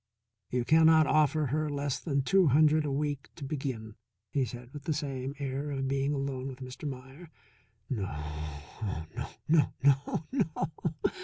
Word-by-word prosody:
"You 125 -1 0
cannot 160 +1 +6
offer 155 0 +3
her 150 +3 0
less 145 -2 -1
than 140 -4 0
two 190 +3 +5
hundred 155 +2 +5
a 145 - -1
week 145 0 -2
to 155 - -9
begin," 135 -6 -3 0.4
he 135 -3 +2
said 120 +1 -9
with 145 -1 -8
the 155 - +1
same 135 -2 -3
air 140 0 -3
of 135 -1 -1
being 135 +1 +1
alone 135 -2 -2
with 130 -2 -6
Mr. 130 +3 -5
Meier. 135 +5 -9 0.6
"No, 110 -9 -1
oh, 75 +4 -5
no, - - -4 0.2
no, 155 -1 +4
no, 140 +2 +3
no!" 165 - 0
140 Hz, 160 wpm, -30 LUFS, 130-150 Hz, 0.6 s, cannot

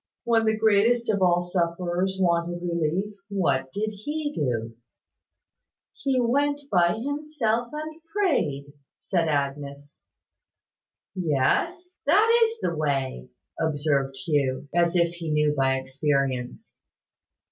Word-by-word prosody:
When 225 -1 +2
the 220 0 +2
greatest 220 +2 +3
of 200 -2 -1
all 175 -1 +3
sufferers 175 +1 -1
wanted 175 -1 0
relief, 170 +4 -1 0.2
what 140 -10 0
did 215 +5 -2
He 295 +8 -4
do?" 115 - -2 1.2
"He 270 -11 0
went 285 +4 +1
by 175 -2 +4
Himself, 255 -3 -2
and 310 +1 -6
prayed," 150 - 0 0.2
said 170 -4 0
Agnes. 140 0 -3 1.1
"Yes, 190 - 0 0.2
that 450 +8 +5
is 450 0 -5
the 170 - -1
way," 135 - -2 0.3
observed 145 -3 0
Hugh, 140 -4 0
as 170 0 +2
if 170 -1 +2
he 170 -2 -6
knew 150 -1 +2
by 135 -1 +2
experience. 130 -1 -2
175 Hz, 115 wpm, -25 LUFS, 145-235 Hz, 1.2 s, that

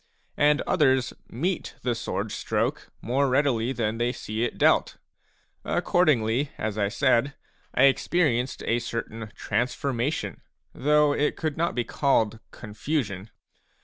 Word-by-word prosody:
And 150 0 +4
others 130 -6 +2 0.2
meet 170 +9 -2
the 125 - +1
sword 115 0 -3
stroke - - -2
more 135 +4 +1
readily 130 -3 +2
than 115 -3 -2
they 120 +1 +1
see 110 -2 -4
it 120 - -2
dealt. - - +3 0.7
Accordingly, 135 -5 +2
as 110 -1 -2
I 100 -2 +1
said, 130 +3 +2 0.4
I 130 - +4
experienced 135 -2 +2
a 115 - +1
certain 115 -2 -5
transformation, 125 +5 -2 0.3
though 150 +1 +3
it 145 +1 0
could 155 -3 -2
not 170 +2 -1
be 120 - +1
called 115 -4 +1
con 105 -3 -10
fusion. 105 - -2
125 Hz, 130 wpm, -26 LUFS, 115-145 Hz, 0.7 s, And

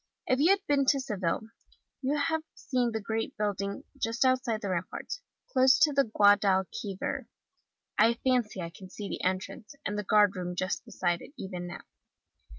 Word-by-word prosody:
If 255 0 +2
you 315 +5 +5
have 395 0 +3
been 280 -1 +2
to 275 +1 +4
Seville 205 -8 -1 0.6
you 280 +3 0
have 320 +2 +1
seen 250 -3 0
the 220 - -2
great 220 +2 -3
building, 200 +3 -2 0.2
just 230 +3 +1
outside 255 -4 +2
the 200 - -3
ramparts, 185 - -4 0.3
close 260 -1 +6
to 300 - +4
the 275 0 +4
Guadalquivir; 200 -2 +2 0.7
I 225 +2 +6
can 255 +1 +2
fancy 210 -4 -8
I 170 - -5 0.2
see 200 +1 -6
the - - -5
entrance, 190 +6 -3
and 210 +1 -1
the - - -2
guard 205 0 +4
room 180 -1 -4
just 185 +1 -2
beside 175 -1 -1
it, - - -12
even 180 -2 -5
now. 175 - -7
215 Hz, 170 wpm, -29 LUFS, 190-260 Hz, 0.7 s, close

